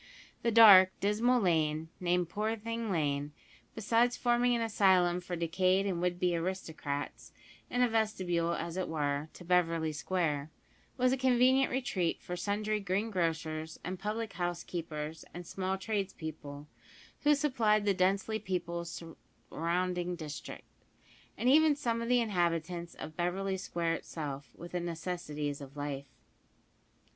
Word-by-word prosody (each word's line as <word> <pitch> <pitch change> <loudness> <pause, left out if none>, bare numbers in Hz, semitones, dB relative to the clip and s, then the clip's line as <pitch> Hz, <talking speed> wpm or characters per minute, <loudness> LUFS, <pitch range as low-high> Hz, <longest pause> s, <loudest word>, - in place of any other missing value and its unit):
The 235 - +1
dark, 200 -5 +8
dismal 225 +5 +2
lane, 160 -4 +1
named 180 -1 +1
Poorthing 225 +3 -3
Lane, 145 -4 -1 0.4
besides 230 +3 +2
forming 240 0 +2
an 235 - -1
asylum 185 -5 +3
for 180 0 -4
decayed 185 +3 +1
and 180 -4 -1
would 175 0 0
be 180 -1 +2
aristocrats, 160 -5 -4 0.4
and 250 0 +2
a - - +5
vestibule, 185 -7 0
as 170 +1 -4
it 185 - -1
were, 145 -1 -1
to 175 - -12
Beverly 165 -3 +2
Square, 150 -2 -1 0.5
was 255 0 +3
a 265 - +1
convenient 260 +1 +4
retreat 205 -10 -1
for 180 - -6
sundry 210 +3 -1
green 200 +3 -1
grocers 160 -3 -2
and 185 +1 -4
public 215 +2 -3
house 175 -1 -2
keepers 160 -2 -5
and 175 0 -7
small 190 +2 -2
trades 195 -1 -2
people, 150 -2 -8 0.5
who 295 0 +4
supplied 230 -8 +2
the 200 - +3
densely 195 +4 +1
peopled 170 -3 -3
surrounding 175 +1 -3
district, 155 -3 -8 0.7
and 245 - -1
even 305 +2 +6
some 235 -5 -1
of 230 - -3
the 250 -1 +4
inhabitants 175 -4 -1
of 155 - -8
Beverly 190 +2 -1
Square 170 -3 -2
itself, 145 -5 -5
with 175 +1 -10
the 180 - -1
necessaries 165 -4 -4
of 140 +1 -10
life. 140 -1 -4
180 Hz, 140 wpm, -32 LUFS, 165-215 Hz, 0.7 s, dark